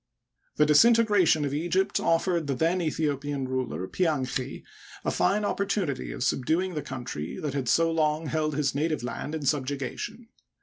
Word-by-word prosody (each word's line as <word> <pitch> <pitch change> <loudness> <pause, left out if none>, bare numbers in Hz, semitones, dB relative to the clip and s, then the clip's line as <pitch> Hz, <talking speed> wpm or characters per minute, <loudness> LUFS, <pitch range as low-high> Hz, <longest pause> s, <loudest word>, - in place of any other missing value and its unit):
The 150 - +4
disintegration 200 -1 +5
of 140 - -3
Egypt 180 +6 0
offered 165 -1 +1
the 135 - 0
then 165 +6 +1
Aethio 155 -3 0
pian 140 -2 -3
ruler, 125 -9 -3
Pianchi, 135 - -1 0.4
a - - +1
fine 210 +1 +1
opportunity 200 -8 -1
of - - -4
subduing 160 +9 0
the 150 - -2
• - - -12
country 120 -12 -5
that 150 -3 -3
had 135 -4 -2
so 165 +4 +3
long 155 0 +1
held 155 -1 -1
his 140 -2 0
native 155 -1 -1
land 125 +5 -4
in 160 - -4
subjuga 140 -2 -1
tion. 230 -1 -7
150 Hz, 170 wpm, -27 LUFS, 135-170 Hz, 0.4 s, disintegration